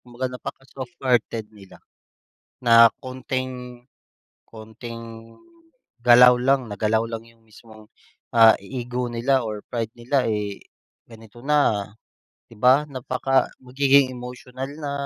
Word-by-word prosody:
kumbaga 125 +1 -5
napaka-softhearted 125 -4 -3
nila 100 -3 -17 0.8
na 115 0 +8
konting, 130 -1 -6 0.6
konting, 115 0 -11 0.7
galaw 125 +1 +8
lang 130 -2 +1
nagalaw 110 +2 0
lang 115 0 -6
yung 115 -1 -23
mismong, 110 -1 -17 0.4
ah, 115 -1 +7
ego 125 +1 -4
nila 125 +2 +1
or 105 -1 -5
pride 115 -1 -4
nila, 125 +2 0
eh. 105 -2 -4 0.5
Ganito 115 +1 -15
na. 140 -9 +1 0.6
'Di 115 - -16
ba? 130 +6 +4
napaka 130 0 0
magiging 135 +1 +3
emosyonal 125 +1 -8
na. 145 -1 -4
120 Hz, 110 wpm, -23 LUFS, 115-130 Hz, 0.8 s, na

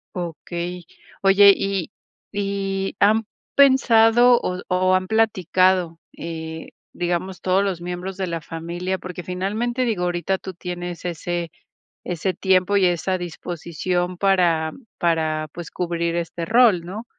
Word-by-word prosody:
Okey, 175 0 -5 0.4
oye, 200 +1 +7
y 195 -4 -2 0.4
y, 195 -1 -2
¿han 215 +2 +4 0.3
pensado 245 -3 +6
o 180 0 -3
o 185 +1 +2
han 185 0 +1
platicado, 185 -5 +2 0.2
eh, 160 -1 -6 0.2
digamos, 175 +1 -2
todos 190 +1 +2
los 190 -4 -2
miembros 180 +2 -5
de 190 -1 -2
la 165 -1 -3
familia?, 170 +4 -4
porque 180 -1 -8
finalmente, 215 +8 -2
digo, 215 -7 -1
ahorita 180 +2 0
tú 190 - -8
tienes 175 -1 -6
ese 175 0 -3 0.6
ese 180 +2 -2
tiempo 190 +2 +2
y 195 - +4
esa 180 +1 0
disposición 175 +1 -3
para 175 -5 +2 0.3
para, 155 -2 0
pues 175 -2 -8
cubrir 170 -1 -2
este 170 0 -3
rol, 220 -5 +4
¿no?, 205 +6 -7
180 Hz, 130 wpm, -22 LUFS, 170-195 Hz, 0.6 s, oye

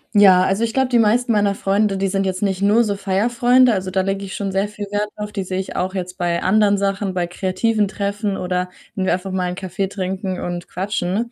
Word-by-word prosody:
Ja, 190 -3 +7
also, 195 +5 +1
ich 225 - -4
glaube 265 -1 +1
die 240 - +3
meisten 230 +3 +3
meiner 205 -2 +2
Freunde, 200 +1 +1
die 195 0 0
sind 195 0 0
jetzt 185 -1 -2
nicht 195 -2 -1
nur 210 +4 +4
so 205 -3 -2
Feierfreunde, 240 +6 +3
also, 190 -2 -2
da 190 +1 +1
lege 195 +1 -2
ich 190 - -7
schon 200 -1 -3
sehr 195 +2 0
viel 210 0 -7
Wert 205 0 0
drauf. 210 0 -6
Die 200 -2 -3
sehe 185 0 -3
ich 190 - -5
auch 185 +1 -1
jetzt 180 -1 -5
bei 175 -2 -1
anderen 205 +1 +3
Sachen, 195 0 -1
bei 180 -1 -1
kreativen 200 +4 0
Treffen 200 0 -2
oder 180 -1 -2 0.3
wenn 190 - -1
wir - - +2
einfach 185 +1 -3
mal 185 -1 -1
'n 180 - -4
Kaffee 190 +1 -3
trinken 190 0 -3
und 175 -1 -4
quatschen. 195 +4 -2
195 Hz, 240 wpm, -20 LUFS, 185-210 Hz, 0.3 s, Ja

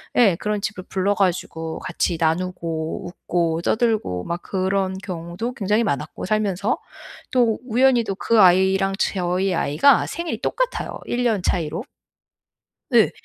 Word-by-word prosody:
예 200 -8 +5
그런 210 -1 -2
집을 195 -3 -4
불러 195 +2 0
가지고 165 -4 -1
같이 175 -1 -1
나누고 165 -1 -2
웃고 170 -2 -1
떠들고 220 - 0
막 170 +1 -4
그런 190 0 -1
경우도 180 +6 -5
굉장히 210 +2 +1
많았고, 150 -2 -3
살면서 205 0 0 0.5
또 240 -4 +2
우연히도 240 -4 +3
그 230 +2 +2
아이랑 190 +1 +4
제 - - 0
저희 180 +2 0
아이가 165 - +4
생일이 340 0 -4
똑같아요, - - -2
1 245 +1 -1
년 215 -5 +2
차이로. 165 +4 -1 1.1
예. 225 -3 +5
190 Hz, 280 characters per minute, -22 LUFS, 170-220 Hz, 1.1 s, 예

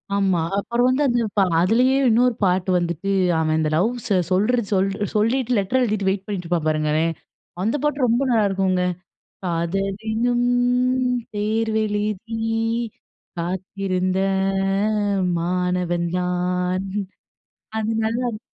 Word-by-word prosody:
ஆமா, 195 -3 +2 0.2
அப்பறம் 235 +4 0
வந்து 260 +3 +2
அந்து 240 -2 +1
பா - - +5 0.2
அதுலேயே 240 +8 +3
இன்னொரு 240 +1 +3
பாட்டு 185 0 +1
வந்துட்டு, 175 +1 -1 0.3
அவன் 155 0 +1
இந்த 155 -1 +1
லவ்ஸ 230 +9 0 0.2
சொல்ற 210 +7 +2
சொல் 195 -1 +2 0.3
சொல்லீட்டு, 235 +4 +1
லெட்டர் 205 +6 +1
எழுதிட்டு 210 -5 0
வெயிட் 195 0 -2
பண்ணீட்ருப்பான் 175 -5 -2
பாருங்களேன். 155 +1 +1 0.5
அந்த 225 +7 +1
பாட்டு 295 -3 +1
ரொம்ப 235 +2 +2
நல்லாருக்குங்க. 195 -4 +2 0.6
"காதலெனும் 195 +8 -1 0.9
தேர்வெழுதி 215 0 -1 1.0
காத்திருந்த 185 +1 -2 1.2
மாணவன் 180 0 -1
தான்." 180 +1 -1 0.9
அது 220 0 -1
நல்லாருக்கும். 230 0 -2
195 Hz, 100 wpm, -22 LUFS, 180-225 Hz, 1.2 s, பா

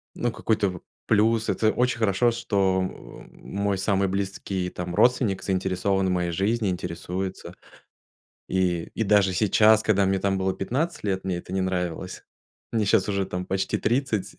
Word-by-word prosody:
Ну 120 -1 -1
какой-то 105 -3 0
в 90 -2 -8 0.3
плюс. 110 +2 +2
Это 110 -1 +2
очень 125 +1 0
хорошо, 110 +2 +2
что, 100 -5 +1
о, 95 - -6
мой 100 0 -3
самый 95 0 +1
близкий, 95 -1 -3
там, 90 0 -5
родственник 120 -6 +2
заинтересован 95 0 0
в - - 0
моей 90 -1 0
жизни, 100 +4 0
интересуется. 90 +1 -4 1.0
И, 90 -3 0
и, - - -1
даже 100 -2 +4
сейчас, 110 +3 +4
когда 100 -2 +2
мне 95 0 +1
там 95 0 0
было 95 0 0
15 140 - -2
лет, 95 -2 -1
мне 95 -2 -1
это 90 - -10
не 95 - 0
нравилось. 90 -1 -3 0.5
Мне 110 -2 +1
щас 100 -1 +2
уже 100 -1 0
там 90 0 -4
почти 95 0 -1
30, 120 -5 -1
95 Hz, 165 wpm, -25 LUFS, 95-110 Hz, 1.0 s, даже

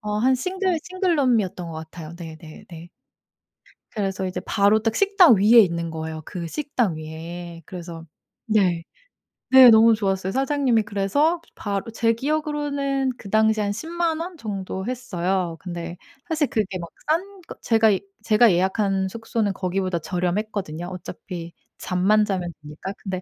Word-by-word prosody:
어 210 -1 -2
한 260 +4 +3
싱글 370 +5 -1
싱글룸이었던 270 - 0
것 165 - -7
같아요. 160 0 -8
네네네. 165 0 -11 1.1
그래서 195 -3 -2
이제 185 0 -4
바로 200 +2 +3
딱 225 0 0
식당 395 - +6
위에 215 +5 +6
있는 170 -4 0
거예요 160 0 -5
그 175 -2 -6
식당 245 - -1
위에. 165 +2 -8
그래서 170 -2 -8 0.4
네. 190 -6 +2 0.7
네, 260 -1 +10
너무 225 +1 +7
좋았어요. 195 -2 -1
사장님이 270 -3 +1
그래서 220 - +1
바로 200 +2 -3
제 230 0 +2
기억으로는 280 -1 -1
그 195 - -11
당시에 220 0 +3
한 200 - -1
100,000 330 +5 -2
원 345 +1 -6
정도 195 -4 -5
했어요. 185 -8 -2
근데 175 -1 -6 0.3
사실 315 -3 +1
그게 210 -5 -2
막 170 - -6 0.2
싼 380 +5 -1
거 - - -8
제가 225 -1 +4
이 195 -3 +1 0.2
제가 225 +1 +5
예약한 190 +2 +1
숙소는 225 0 -2
거기보다 185 -1 -1
저렴했거든요. 180 -1 -3
어차피 180 -1 -7 0.3
잠만 195 +4 +2
자면 180 -4 -3
되니까. 150 +6 -7
근데 185 -2 -4
200 Hz, 305 characters per minute, -23 LUFS, 180-250 Hz, 1.1 s, 네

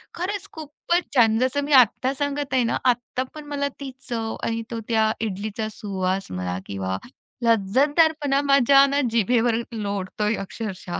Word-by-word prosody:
खरंच 395 +3 -4
खूपच 320 +3 -3
छान 225 -3 +5
जसं 260 +3 0
मी 295 - -1
आत्ता 255 +4 -3
सांगत 285 0 -3
आहे 255 -2 +3
ना, - - +1
आत्ता 245 +1 +1
पण 300 -1 -9
मला 280 0 0
ती 270 - -5 0.2
चव 225 -2 -3
आणि 230 0 -1
तो 230 - -3
त्या 220 -1 +3
इडलीचा 215 +1 -3
सुवास 195 - -3
म्हणा 90 0 -3
किंवा 95 -1 -3 0.5
लज्जतदारपणा 280 - +3
माझ्या 275 +1 +6
ना 280 +1 +1
जिभेवर 235 +1 +2
लोळतोय 205 0 -2
अक्षरशः. 190 -5 -6
235 Hz, 145 wpm, -23 LUFS, 210-280 Hz, 0.5 s, माझ्या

